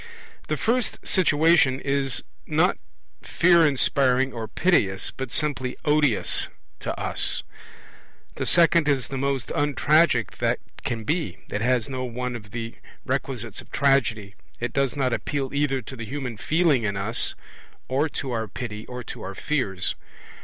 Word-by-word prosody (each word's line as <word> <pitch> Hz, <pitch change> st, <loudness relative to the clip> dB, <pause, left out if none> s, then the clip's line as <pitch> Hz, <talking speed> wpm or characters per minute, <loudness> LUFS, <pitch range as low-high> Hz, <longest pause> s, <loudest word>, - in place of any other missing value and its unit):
The -, -, -1 dB
first 240 Hz, 0 st, 0 dB
situation 160 Hz, -5 st, +4 dB
is 140 Hz, -2 st, -1 dB, 0.2 s
not -, -, +2 dB, 0.4 s
fear 170 Hz, -2 st, +4 dB
inspiring 135 Hz, -1 st, +2 dB
or 115 Hz, -2 st, -5 dB
piteous, 105 Hz, -, +1 dB
but 130 Hz, -2 st, -6 dB
simply 130 Hz, -4 st, 0 dB
odious 150 Hz, -6 st, +2 dB, 0.3 s
to -, -, -4 dB
us. -, -, 0 dB, 0.9 s
The -, -, -4 dB
second 170 Hz, -2 st, +5 dB
is 140 Hz, -4 st, +1 dB
the 135 Hz, -, -3 dB
most 135 Hz, -2 st, -1 dB
untragic 145 Hz, -, +2 dB
that -, -, +1 dB, 0.3 s
can 115 Hz, -2 st, -2 dB
be; 130 Hz, -, -1 dB
it 105 Hz, -, -2 dB
has 120 Hz, -1 st, +2 dB
no 130 Hz, -1 st, -4 dB
one 125 Hz, 0 st, -3 dB
of 105 Hz, -3 st, -9 dB
the 115 Hz, +1 st, -5 dB, 0.3 s
requisites -, -, -3 dB
of -, -, -18 dB
Tragedy; 120 Hz, -8 st, +2 dB, 0.3 s
it 120 Hz, -, -3 dB
does 140 Hz, -1 st, +1 dB
not 130 Hz, -3 st, +1 dB
appeal 135 Hz, +1 st, -2 dB
either 140 Hz, -2 st, 0 dB
to 130 Hz, -, -8 dB
the 115 Hz, -2 st, -6 dB
human 130 Hz, -1 st, -4 dB
feeling 155 Hz, +2 st, +2 dB
in 100 Hz, -3 st, -1 dB
us, 105 Hz, +4 st, 0 dB, 0.5 s
or 140 Hz, +5 st, +1 dB
to 135 Hz, -2 st, -4 dB
our 110 Hz, -2 st, -2 dB
pity, 105 Hz, 0 st, -6 dB
or 125 Hz, 0 st, -6 dB
to -, -, -8 dB
our 95 Hz, +1 st, -6 dB
fears. 95 Hz, -, -1 dB
130 Hz, 150 wpm, -25 LUFS, 115-145 Hz, 0.9 s, second